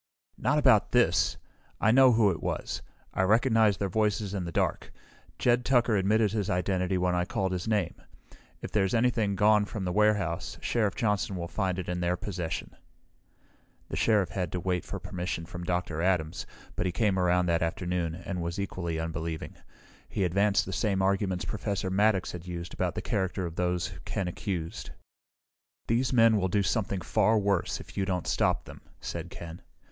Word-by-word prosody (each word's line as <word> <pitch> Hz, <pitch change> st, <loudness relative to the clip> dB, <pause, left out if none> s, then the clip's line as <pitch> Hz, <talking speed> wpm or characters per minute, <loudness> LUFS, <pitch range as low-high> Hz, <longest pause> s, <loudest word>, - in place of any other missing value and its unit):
"Not 150 Hz, -, +2 dB
about 130 Hz, -8 st, +4 dB
this! 120 Hz, -9 st, +3 dB, 0.4 s
I 110 Hz, -, +4 dB
know 130 Hz, 0 st, +7 dB
who 110 Hz, -3 st, +4 dB
it 85 Hz, -, -5 dB
was. -, -, -3 dB, 0.3 s
I -, -, 0 dB
recognized 110 Hz, 0 st, +4 dB
their 100 Hz, -, 0 dB
voices 105 Hz, 0 st, 0 dB
in 95 Hz, -3 st, -2 dB
the 85 Hz, -, -5 dB
dark. -, -, -1 dB, 0.5 s
Jed 120 Hz, 0 st, +2 dB
Tucker 120 Hz, -3 st, +3 dB
admitted 105 Hz, +2 st, +3 dB
his 105 Hz, -2 st, -1 dB
identity 90 Hz, 0 st, 0 dB
when 90 Hz, 0 st, +1 dB
I 90 Hz, 0 st, +1 dB
called 95 Hz, 0 st, -1 dB
his 90 Hz, +2 st, -3 dB
name. 105 Hz, -6 st, +1 dB, 0.7 s
If -, -, -5 dB
there's 95 Hz, 0 st, +1 dB
anything 115 Hz, -4 st, +2 dB
gone 105 Hz, +1 st, +4 dB
from 100 Hz, -1 st, -5 dB
the 90 Hz, -, -1 dB
warehouse, 105 Hz, -4 st, +1 dB
Sheriff 105 Hz, -5 st, 0 dB
Johnson 105 Hz, -5 st, 0 dB
will 85 Hz, -1 st, -4 dB
find 95 Hz, -1 st, -1 dB
it 90 Hz, -, -4 dB
in 90 Hz, 0 st, -2 dB
their 90 Hz, +1 st, 0 dB
possession." 90 Hz, -5 st, -4 dB, 1.1 s
The -, -, -4 dB
Sheriff 105 Hz, -5 st, +2 dB
had 90 Hz, -4 st, -3 dB
to 90 Hz, -, -1 dB
wait 90 Hz, 0 st, -1 dB
for 100 Hz, -, -5 dB
permission 90 Hz, -2 st, -4 dB
from 85 Hz, 0 st, -7 dB
Dr. 90 Hz, -3 st, -1 dB
Adams, 90 Hz, -4 st, 0 dB, 0.3 s
but 90 Hz, -, 0 dB
he -, -, 0 dB
came 95 Hz, +1 st, +1 dB
around 90 Hz, 0 st, +3 dB
that 85 Hz, -1 st, +1 dB
afternoon, 85 Hz, 0 st, -1 dB
and 90 Hz, +1 st, -5 dB
was 85 Hz, +1 st, -3 dB
equally 85 Hz, -4 st, -3 dB
unbelieving. 80 Hz, 0 st, -4 dB, 0.6 s
He 100 Hz, -, -1 dB
advanced 100 Hz, +3 st, +2 dB
the 95 Hz, -, -5 dB
same 100 Hz, -3 st, +1 dB
arguments 95 Hz, -2 st, 0 dB
Professor 100 Hz, -3 st, -2 dB
Maddox 100 Hz, -1 st, +2 dB
had 90 Hz, 0 st, -8 dB
used 85 Hz, 0 st, -6 dB
about 90 Hz, -1 st, -1 dB
the -, -, -4 dB
character 95 Hz, -4 st, -1 dB
of 85 Hz, -1 st, -6 dB
those 90 Hz, -1 st, -1 dB
Ken 95 Hz, -, -2 dB
accused. 90 Hz, -2 st, -4 dB, 1.0 s
"These 120 Hz, +3 st, +1 dB
men 115 Hz, -3 st, +5 dB
will 95 Hz, -2 st, +1 dB
do 100 Hz, +2 st, +2 dB
something 100 Hz, -2 st, -1 dB
far 110 Hz, +7 st, +2 dB
worse, 100 Hz, -3 st, 0 dB
if -, -, -12 dB
you 95 Hz, -, 0 dB
don't 90 Hz, -3 st, -2 dB
stop -, -, +1 dB
them," -, -, -11 dB, 0.2 s
said 85 Hz, 0 st, -5 dB
Ken. 85 Hz, -1 st, -9 dB
95 Hz, 180 wpm, -29 LUFS, 90-105 Hz, 1.1 s, know